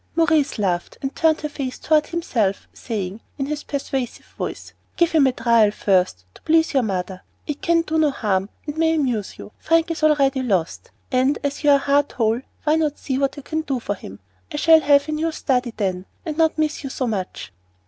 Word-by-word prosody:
Maurice 320 -4 +2
laughed, 180 -4 -1
and 270 - -3
turned 320 -1 +2
her 300 - -2
face 275 -3 -5
toward 305 -1 +2
himself, 235 - -1
saying, 205 -2 -5 0.2
in 270 - -1
his 295 +1 -3
persuasive 270 -3 -4
voice, - - -6 0.2
"Give 340 -1 +3
him 300 -4 +5
a - - +3
trial 230 -3 +3
first, 185 - +1
to - - -17
please 320 0 +2
your 270 - +4
mother. 190 -3 -3 0.2
It 295 -2 -5
can 340 -3 +2
do 320 0 -1
no 310 -1 +4
harm 200 -7 -1 0.2
and 300 +1 -5
may 325 0 +3
amuse 245 -9 -1
you. - - -10
Frank 330 0 +2
is 325 - -4
already 280 -4 +3
lost, 190 -9 -1 0.2
and, 260 +2 +2
as 285 +2 -3
you 295 - +4
are 285 - +7
heart 285 +1 +1
whole, 225 0 +1 0.2
why 310 +1 +3
not 305 -2 0
see 265 -2 -2
what 275 +1 0
you 285 - -8
can 315 +2 -2
do 275 -5 -2
for 205 - -2
him? 100 - -11 0.3
I - - -4
shall 320 +1 +6
have 285 0 +4
a - - -3
new 315 +2 -1
study, 255 -5 0
then, 185 -3 -2 0.2
and 315 -3 -3
not 320 0 +2
miss 310 0 -1
you 275 - -4
so 260 - -2
much." 190 - -4
275 Hz, 210 wpm, -22 LUFS, 220-310 Hz, 0.3 s, are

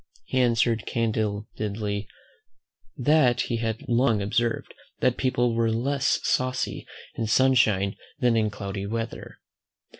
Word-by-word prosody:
He 130 - -1
answered 115 -2 +2
candidly, 105 -2 -2 0.9
"that 130 -2 +3
he 120 - -2
had 115 -1 -3
long 120 -2 +3
observed, 115 +4 -1 0.3
that 125 -1 +2
people 120 -2 +1
were 115 0 +1
less 135 +5 +1
saucy 130 0 -1 0.3
in 115 - -3
sunshine 110 -6 +3 0.2
than 120 -2 +2
in 110 -1 +2
cloudy 100 -1 -5
weather." 115 +1 -5
115 Hz, 115 wpm, -25 LUFS, 105-125 Hz, 0.9 s, that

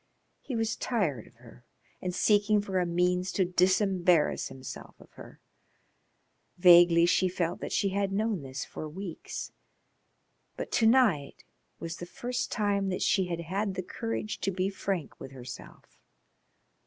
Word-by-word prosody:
He 260 - -5
was 225 -1 0
tired 170 - -1
of - - -21
her 120 0 -17 0.4
and 180 - -2
seeking 210 +1 +3
for 195 -2 -1
a 180 - 0
means 180 +2 +1
to 190 - +2
disembarrass 180 -2 +2
himself 130 0 -10
of - - -18
her. - - -13 1.2
Vaguely 175 -1 +7
she 185 +1 +2
felt 175 -1 -2
that - - -5
she 200 - +1
had 195 0 -1
known 210 -2 -1
this 135 0 -6
for 155 - -7
weeks, 180 +1 -7 1.1
but - - -5
to 225 - +3
night 220 - +2 0.4
was 165 0 -5
the 175 - -7
first 245 +6 -4
time 200 -3 0
that 185 - -2
she 190 -2 +2
had 170 -1 -3
had 195 +4 -3
courage 225 -2 -4
to - - -1
be 190 +1 -1
frank 195 -4 -4
with 135 0 -9
herself. 125 -1 -11
185 Hz, 150 wpm, -29 LUFS, 170-200 Hz, 1.2 s, Vaguely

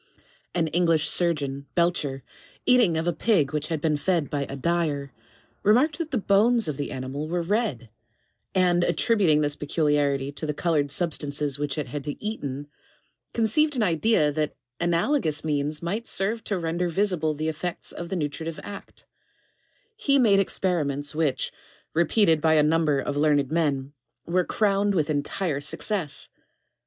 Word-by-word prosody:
An 170 -2 +2
English 165 -2 +2
surgeon, 140 -6 0
Belcher, 150 -6 0 0.4
eating 240 -10 +4
of 160 - -1
a 175 - +1
pig 155 -5 +1
which 150 0 -2
had 160 -2 -2
been 150 0 +1
fed 165 -1 0
by 140 -1 -1
a 135 - -7
dyer, 145 -3 -1 0.5
remarked 270 - +3
that 330 -2 -3
the 270 - -1
bones 215 +2 +3
of 150 - -2
the 145 - -4
animal 135 +3 -4
were 170 +1 -1
red, 175 - -1 0.7
and 175 -1 +3
attributing 190 -9 +2
this 145 -1 0
peculiarity 145 -2 0
to 155 +2 -6
the 150 - -2
colored 150 -4 +1
sub 170 +2 +2
stances 145 -1 0
which 145 -1 -2
it 150 - -1
had 145 +2 -6
eaten, 145 -10 -4 0.7
conceived 275 +7 +2
an 240 - +1
idea 165 -3 +2
that 150 0 -2 0.2
analogous 170 - +1
means 150 +1 -1
might 205 +7 -3
serve 215 +4 0
to 200 - -1
render 170 +1 -1
visible 170 -4 0
the 155 +2 -3
effects 160 +3 -3
of 170 0 -7
the 190 - -2
nutritive 160 0 -4
act; 200 -1 -10 0.9
he 295 -11 +2
made 215 -7 +5
experiments 150 -7 0
which, 155 -4 0 0.4
repeated 165 0 +3
by 160 0 +4
a 150 - +5
number 155 -1 +2
of 140 +1 -2
learned 145 -2 +2
men, 145 -4 0 0.3
were 180 +2 +1
crowned 200 0 +1
with 155 -3 +1
entire 145 +1 -2
success. 155 +2 -2
160 Hz, 155 wpm, -25 LUFS, 145-190 Hz, 0.9 s, made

